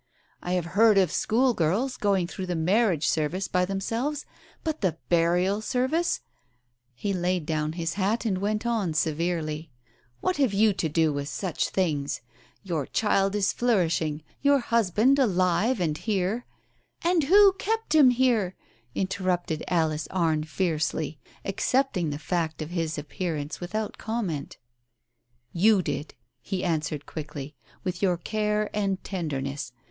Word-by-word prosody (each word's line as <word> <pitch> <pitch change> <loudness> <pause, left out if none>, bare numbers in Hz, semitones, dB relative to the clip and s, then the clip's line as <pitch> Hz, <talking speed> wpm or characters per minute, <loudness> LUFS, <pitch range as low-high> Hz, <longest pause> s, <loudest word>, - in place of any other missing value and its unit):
I 180 - -2
have 180 -2 0
heard 215 +1 +6
of 185 -4 +4
schoolgirls 235 0 +1
going 200 -6 +1
through 185 +1 -6
the 180 - -1
marriage 175 -1 +2
service 165 +5 0
by 180 0 +1
themselves, 230 +10 -2 0.4
but 315 -1 -2
the 180 -5 0
burial 180 +4 +2
service 260 +9 0 0.4
" 125 - -47 0.3
He 200 +11 -2
laid 180 -2 0
down 155 -1 -1
his 165 -1 -2
hat 210 +4 0
and 190 -4 0
went 210 +3 -1
on 215 -9 0
severely, 160 0 -1 0.5
"What 370 - 0
have 260 -8 +2
you 215 +1 +4
to 185 -4 -1
do 160 0 +2
with 145 0 -3
such 180 -4 -2
things? 150 -7 -1 0.4
Your 165 -8 -2
child 195 -2 +1
is 205 -2 +2
flourish 195 -10 +2
ing 155 -1 -3
— - - -35
your 285 0 +5
husband 235 +2 +2
alive 200 +1 +2
and 160 -4 0
here 210 +2 -1 0.3
" - - -29
"And 340 -3 +3
who 395 +5 +7
kept 445 -5 -1
him 295 -5 +7
here?" 235 -7 +2 0.4
interrupted 185 -4 -1
Alice 160 -3 0
Arne 160 -4 +1
fiercely, 160 -2 -1 0.3
accepting 195 - +1
the 145 - -3
fact 160 0 -2
of 155 - -9
his 165 -3 -2
appearance 150 0 -4
without 210 +4 -4
comment. 200 -11 -3 1.0
"You 195 +2 +4
did," 145 0 -4 0.3
he 190 -2 -3
answered 155 -4 -1
quickly, 150 -2 -7 0.3
"with 185 -1 -3
your 185 -3 +2
care 210 +3 -1
and 195 -2 -1
tenderness. 140 -7 -3
185 Hz, 145 wpm, -26 LUFS, 160-215 Hz, 1.0 s, who